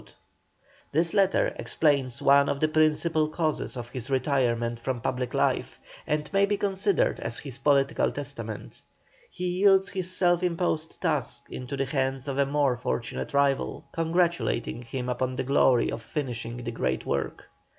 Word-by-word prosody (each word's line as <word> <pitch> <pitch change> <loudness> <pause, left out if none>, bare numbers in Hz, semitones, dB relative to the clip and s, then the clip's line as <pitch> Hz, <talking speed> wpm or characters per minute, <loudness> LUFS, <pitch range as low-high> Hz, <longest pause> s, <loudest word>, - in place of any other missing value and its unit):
This 165 +3 +1
letter 195 -2 +3
explains 140 -6 +1
one 140 0 +5
of 140 - -1
the 155 - +3
principal 155 0 +2
causes 155 -4 -2
of 120 -1 -6
his 130 0 -6
retirement 120 -4 +1
from 125 +1 -2
public 125 +1 -2
life, - - 0 0.3
and 150 0 0
may 200 0 +4
be 205 0 0
considered 195 -1 +1
as 115 - -4
his 135 -4 -9
political 140 0 +2
testament. - - -6 0.5
He 180 - -5
yields 195 -1 +5
his 185 -1 -3
self 175 -1 +2
imposed 170 -3 -1
task 150 -8 -1
into 130 +2 -5
the 135 - 0
hands 135 0 -1
of 140 0 -2
a 140 - +3
more 140 -3 +2
fortunate 120 +2 -3
rival, 140 -1 +1
congratulating 165 -8 0
him 125 +1 -5
upon 130 +1 -1
the - - -1
glory 130 -2 +3
of 115 - -5
finishing 120 -3 -4
the 120 - -3
great 65 - -2
work. 70 - -2
140 Hz, 155 wpm, -27 LUFS, 125-165 Hz, 0.5 s, one